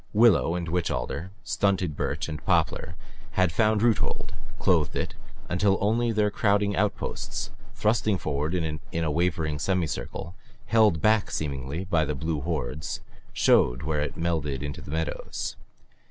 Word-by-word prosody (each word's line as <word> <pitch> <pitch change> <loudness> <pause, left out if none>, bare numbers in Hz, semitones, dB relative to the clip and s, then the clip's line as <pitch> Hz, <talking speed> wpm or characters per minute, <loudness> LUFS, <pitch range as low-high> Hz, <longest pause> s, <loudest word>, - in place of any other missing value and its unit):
Willow 105 -6 +5
and 85 -1 -3
witch 85 +1 0
alder, 85 +6 -3
stunted 95 -6 +1
birch - - -2
and 75 -1 -6
poplar 80 0 +1 0.4
had 95 -2 +3
found 110 +3 +2
roothold, 115 -3 +1 0.2
clothed 80 -6 +2
it, - - -2 0.3
until 95 +2 +2
only 115 +3 +2
their 105 -1 +2
crowding 100 -1 +2
outposts, 100 +1 -2 0.2
thrusting 110 -3 +2
forward 75 +1 -1
in 80 -3 -1 0.2
a 80 - +1
wavering 80 -2 0
semicircle, 85 0 -2 0.3
held 105 -9 +4
back 110 -1 +4
seemingly 70 +2 -3
by 85 -3 +2
the 75 0 -2
blue 75 +2 -2
hordes, 75 -2 -3 0.3
showed 60 +2 +3
where 75 -1 0
it 75 - -3
melted 80 -5 -1
into 75 -1 -5
the - - -11
meadows. 80 -3 -3
85 Hz, 140 wpm, -27 LUFS, 75-100 Hz, 0.4 s, Willow